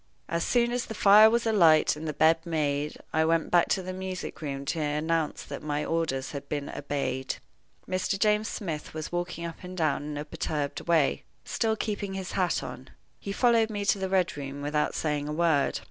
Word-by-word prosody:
As 170 0 -1
soon 240 -1 +2
as 245 0 -2
the 220 - -6
fire 210 +2 +8
was 235 +1 +1
alight 170 -11 +5
and 155 +1 -6
the - - 0
bed 160 +2 +3
made, 150 -3 -1 0.2
I 160 - +3
went 165 0 +1
back 175 -1 +5
to 190 - +1
the 185 +1 -5
music 185 -2 -5
room 140 -2 -4
to 160 +3 -2
announce 155 +1 -1
that - - -7
my 150 0 -2
orders 160 -5 -1
had 140 -1 -7
been 145 -1 -3
obeyed. 135 -2 -3 0.5
Mr. 185 +2 -1
James 210 +1 +2
Smith 160 -9 -5
was 155 -1 -5
walking 175 -1 -3
up 170 - -6
and 185 0 -8
down 155 -5 +1
in 150 0 -5
a 145 - -4
perturbed 150 -1 -3
way, 160 -5 +3 0.2
still 220 -1 0
keeping 205 -2 -3
his 190 -1 -5
hat 185 -2 0
on. - - -8 0.3
He 200 - -5
followed 230 +1 +3
me 205 -2 -3
to 200 - +2
the 190 0 -2
Red 185 -1 +1
Room 140 0 -6
without 150 +1 0
saying 150 -2 -1
a 150 - -3
word. 160 -3 +2
165 Hz, 205 wpm, -28 LUFS, 150-190 Hz, 0.5 s, fire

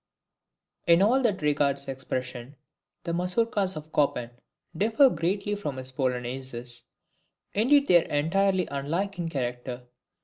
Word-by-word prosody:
In 170 +2 +6
all 250 +6 +4
that 205 -10 0
regards 140 -2 +1
expression, 130 0 -5 0.5
the 170 - -3
MAZOURKAS 190 +2 0
of 155 0 -8
Chopin 125 -5 +1 0.4
differ 225 - +4
greatly 195 +5 -1
from 150 -10 -4
his 130 0 -5
POLONAISES. 125 -1 -3 0.7
Indeed 275 +7 +4
they 175 -2 +6
are - - -12
entirely 185 +5 +1
unlike 170 +8 -2
in 170 -1 -2
character. 125 -3 -4
155 Hz, 125 wpm, -27 LUFS, 130-195 Hz, 0.7 s, In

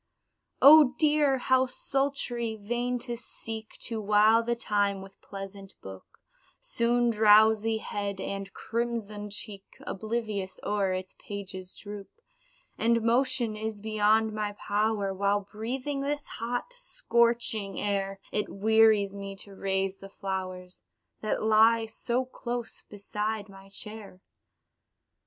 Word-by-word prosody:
Oh 290 -2 +9
dear! 295 -3 +3
how 260 0 +3
sultry! 255 -3 -2
vain 240 +4 -1
to 240 -2 -3
seek 225 -2 -6
To 225 -2 -3
while 215 +2 +5
the 235 +1 -1
time 205 -3 0
with 195 0 -15
pleasant 195 0 -9
book, 95 -1 -12 0.4
Soon 240 0 +1
drowsy 220 +1 +5
head 200 -2 -4
and 195 0 -4
crimsoned 220 -3 -3
cheek 205 -1 -5 0.2
Oblivious 215 -2 -3
o'er 200 -2 0
its 185 0 -4
pages 190 -2 -7
droop 205 -1 -8 0.7
And 230 0 +2
motion 240 -1 +2
is 215 0 -4
beyond 215 +1 +2
my 210 -1 -2
power, 205 -1 0
While 200 +1 +1
breathing 250 +7 -4
this 290 +1 -2
hot, 245 - -4
scorching 235 - +1
air, 195 -1 -1
It 210 - -1
wearies 215 -1 +4
me 200 0 -6
to 200 0 -9
raise 195 0 -1
the 195 - -10
flowers, 185 -2 -5 0.4
That 215 - -1
lie 220 +1 +5
so 235 +3 -2
close 240 -2 -5
beside 210 +1 -3
my 195 0 -14
chair. 205 -1 -7
215 Hz, 120 wpm, -28 LUFS, 200-235 Hz, 0.7 s, Oh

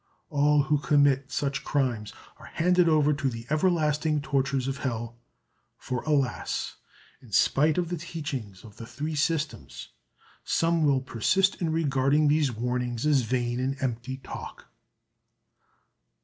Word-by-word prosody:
All 145 0 +3
who 150 0 +1
commit 140 -2 +2
such 140 -1 -2
crimes 120 -7 -1 0.3
are - - -13
handed 180 +1 +2
over 150 -1 +3
to 140 -1 -1
the 115 -2 -7
everlasting 155 -2 +1
tortures 135 -1 0
of 135 0 -2
hell; 115 -2 -3 0.6
for 125 -2 -4
alas! 140 -5 -1 0.4
in 120 - -17
spite 150 +9 +3
of 175 -2 0
the 175 - -2
teachings 140 - -6
of 105 -3 -14
the 115 - -9
Three 145 +7 -4
Systems 150 +1 -2 0.5
some 165 -1 +1
will 140 -2 +3
persist 185 - +1
in 165 -2 0
regarding 145 -1 +2
these 150 -2 +2
warnings 125 +1 -2
as 145 -3 +4
vain 120 +1 -1
and 135 +2 -1
empty 130 0 -3
talk. 130 - -9
140 Hz, 135 wpm, -27 LUFS, 125-155 Hz, 0.6 s, as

